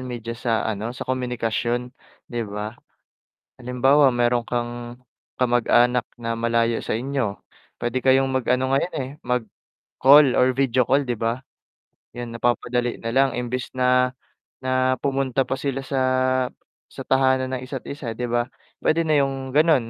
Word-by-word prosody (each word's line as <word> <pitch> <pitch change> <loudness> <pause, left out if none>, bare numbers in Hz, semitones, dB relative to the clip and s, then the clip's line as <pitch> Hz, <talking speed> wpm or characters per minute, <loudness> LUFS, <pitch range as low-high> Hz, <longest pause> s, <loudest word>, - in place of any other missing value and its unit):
media 120 -2 -5
sa 115 -1 -1
ano, 110 0 -2
sa - - -5
komunikasyon, 125 -1 -2 0.3
di 120 -1 -4
ba? 105 +1 -5 0.9
Halimbawa, 130 +2 +3
meron 120 0 +1
kang 120 0 -4 0.4
kamag-anak 120 0 +3 0.2
na 115 0 -2
malayo 115 0 +1
sa - - -1
inyo 120 -3 -2 0.3
puwede 120 +2 -2
kayong 135 +1 +3
mag-ano 130 0 +1
ngayon, 140 +6 +1
eh, 130 -2 -3
mag-call 130 +3 +2
or 130 0 +4
video 130 -2 +2
call 140 +2 +3
di 125 - -3
ba? 115 +3 -1 0.7
'Yun 120 -1 -7
napapadali 120 +1 0
nalang 130 +4 +2
imbes 125 +1 -3
na 125 0 +3 0.5
na 130 0 +1
pumunta 135 -1 0
pa - - -1
sila 135 0 -3
sa 135 -1 -1 0.9
sa - - -7
tahanan 130 0 +2
ng 125 - -5
isa't 130 -1 -6
isa 140 -5 -5
di 125 0 -2
ba, 120 +1 0 0.3
pwede 165 +1 +2
na 155 - +3
yung 135 -1 -4
ganon 150 -7 +4
125 Hz, 140 wpm, -23 LUFS, 120-130 Hz, 0.9 s, or